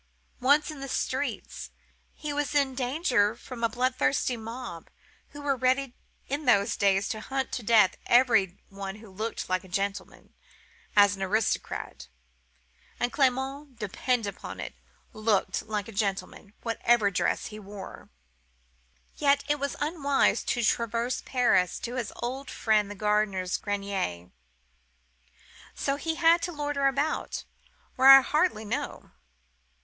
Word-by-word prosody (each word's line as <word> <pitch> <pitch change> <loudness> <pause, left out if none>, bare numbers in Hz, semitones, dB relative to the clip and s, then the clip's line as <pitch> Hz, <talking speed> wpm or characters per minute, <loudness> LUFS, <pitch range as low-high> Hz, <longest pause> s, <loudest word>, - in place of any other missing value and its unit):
Once 285 +5 +3
in 300 - -9
the 275 - -5
streets, - - -3 0.5
he 300 -1 -4
was 295 -1 -2
in 280 -2 +2
danger 250 - +1
from 245 +1 -10
the 230 - +2
bloodthirsty 255 +2 +1
mob, 225 -7 -7 0.4
who 290 -1 -10
were 280 -1 +1
ready 260 +1 +1 0.3
in 290 +3 -3
those 225 -3 +3
days 195 -1 +2
to 220 - -3
hunt 265 +3 -3
to 250 - -3
death 220 -3 +4
every 225 -7 +4
one 195 0 -6
who 215 +1 -13
looked 215 +4 -4
like 185 0 0
a - - -13
gentleman, 195 +2 -4 0.6
as 205 -1 +6
an 195 - -10
aristocrat: 200 - -2 0.9
and 245 0 0
Clement, 270 0 0
depend 230 +3 -1
upon 200 - -7
it, - - -5 0.4
looked 215 -3 +1
a 210 -1 -3
gentleman, 200 0 -3
whatever 230 -2 +2
dress 180 - 0
he 215 - -7
wore. 205 -1 -10 1.1
Yet 285 -1 +3
it 295 0 +1
was 280 +1 -2
unwise 290 -2 +2
to 240 - 0
traverse 235 +2 0
Paris 235 -8 +2
to 240 - -4
his 245 -4 -3
old 255 +3 -4
friend 215 -2 +1
the 205 - -7
gardener's 205 -3 0
grenier, 195 - -3 1.4
so 275 - -1
he 325 +2 -2
had 335 +1 +5
to 350 - -2
loiter 290 -3 0
about, 280 +3 -1 0.5
where 260 +1 +7
I 270 0 +12
hardly 300 -5 +1
know. 205 - -4
240 Hz, 135 wpm, -28 LUFS, 205-275 Hz, 1.4 s, I